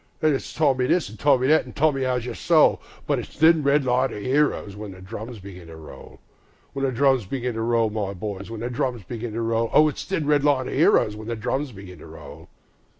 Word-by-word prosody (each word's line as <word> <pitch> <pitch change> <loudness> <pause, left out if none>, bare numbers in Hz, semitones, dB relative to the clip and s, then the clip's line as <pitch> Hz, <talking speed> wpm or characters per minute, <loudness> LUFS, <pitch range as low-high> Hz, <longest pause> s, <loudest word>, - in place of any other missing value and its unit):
Then 155 -1 +2
it's 135 - -4
Tommy 135 -5 +1
this, 160 - +1
an' 110 - -12
Tommy 130 +2 +3
that, 155 +1 +4
an' - - -11
"Tommy, 140 -3 +1
'ow's 125 -2 -1
yer 125 - -5
soul?" - - +3 0.2
But - - 0
it's - - -10
"Thin 160 +1 +5
red 140 0 +2
line 130 +1 +1
of - - -6
'eroes" 130 -3 0
when 105 -2 -8
the 95 - -13
drums 110 +5 -8
begin 95 -3 -11
to 80 - -11
roll, 80 -4 -13 0.6
The 135 -1 -1
drums 130 -2 +2
begin 125 +1 -3
to 110 - -4
roll, 115 -1 +1
my 105 -2 -3
boys, 100 +1 -6
the 115 +1 -5
drums 120 -2 -2
begin 115 +3 -6
to 115 - -3
roll, 115 0 0
O 155 - +5
it's 150 - -4
"Thin 165 -6 -2
red 145 -1 +2
line 140 -3 +2
of - - -5
'eroes" 105 - +3
when 110 +1 -9
the 115 - -2
drums 130 +5 -3
begin 95 -5 -12
to - - -12
roll. - - -12
120 Hz, 230 wpm, -23 LUFS, 105-140 Hz, 0.6 s, Thin